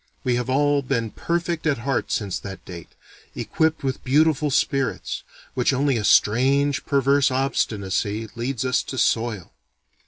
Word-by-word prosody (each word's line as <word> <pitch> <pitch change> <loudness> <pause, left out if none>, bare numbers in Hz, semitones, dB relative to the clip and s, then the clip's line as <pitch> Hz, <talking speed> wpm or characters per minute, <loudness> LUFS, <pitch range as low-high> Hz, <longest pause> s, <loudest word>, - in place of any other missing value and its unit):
We 125 -3 +1
have 120 +1 -1
all 145 +2 +2
been 115 -5 -2
perfect 170 -1 -2
at 145 - +2
heart 125 +2 -2
since 100 -4 -2
that 95 -1 -9
date, 85 -2 -9 0.5
equipped 160 -1 0
with 135 -1 -3
beautiful 150 +2 +3
spirits, 135 -3 -1 0.3
which 125 +2 +1
only 135 0 +1
a 110 - -1
strange 135 +7 +3
perverse 140 0 +3
obstinacy 110 -5 -1
leads 120 +1 -3
us 130 - +2
to 130 - -7
soil. 115 -6 0
130 Hz, 145 wpm, -23 LUFS, 115-140 Hz, 0.5 s, beautiful